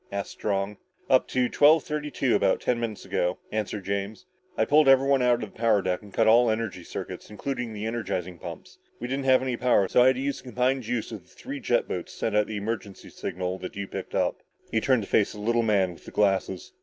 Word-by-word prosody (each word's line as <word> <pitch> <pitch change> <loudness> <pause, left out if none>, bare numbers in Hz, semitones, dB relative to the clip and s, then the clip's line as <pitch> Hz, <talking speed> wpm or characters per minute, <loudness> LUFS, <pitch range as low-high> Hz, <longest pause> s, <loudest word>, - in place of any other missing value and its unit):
asked 100 0 -4
Strong. 100 0 -2 0.3
"Up 130 - +5
to 125 -1 +1
twelve 150 +3 +5
thirty 150 -1 -3
two 130 -4 0
about - - +2
ten 120 -1 0
minutes 115 -3 -4
ago," 90 +1 -1
answered 105 -2 -3
James. 100 - -3 0.3
"I - - +3
pulled 150 0 +4
everybody 135 0 +5
out 120 -1 +3
of 105 - -8
the - - -19
power 110 -4 +3
deck 90 -1 -1
and 105 -1 -14
cut 115 - +2
all 120 +2 +6
energy 110 -5 -2
circuits, - - -7
including 125 +2 -4
the 105 0 -5
energizing 90 -6 -3
pumps. - - -9 0.2
We 120 - -4
didn't 135 +1 -2
have 130 -1 +5
any 130 -2 -2
power 120 -6 +3
so 125 - +4
I 125 - +6
had 130 - +4
to 130 - -4
use 140 0 -1
the - - -13
combined 125 +2 0
juice 120 -1 -3
of 110 -4 -7
the 90 - -27
three 140 +1 -7
jet 120 -2 +1
boats 90 - -5
to - - -13
send 110 - -1
out 105 0 +3
the 110 - -4
emergency 105 -1 -5
signal 90 +1 -4
that 90 - -7
you 100 0 -3
picked - - -7
up." - - 0 0.3
He 110 - +1
turned 130 -3 +2
to - - -8
face 105 - +2
the 105 - -9
little 115 +3 +1
man 100 -5 +2
with - - -17
the - - -8
glasses. 95 -3 0
110 Hz, 245 wpm, -26 LUFS, 100-125 Hz, 0.3 s, all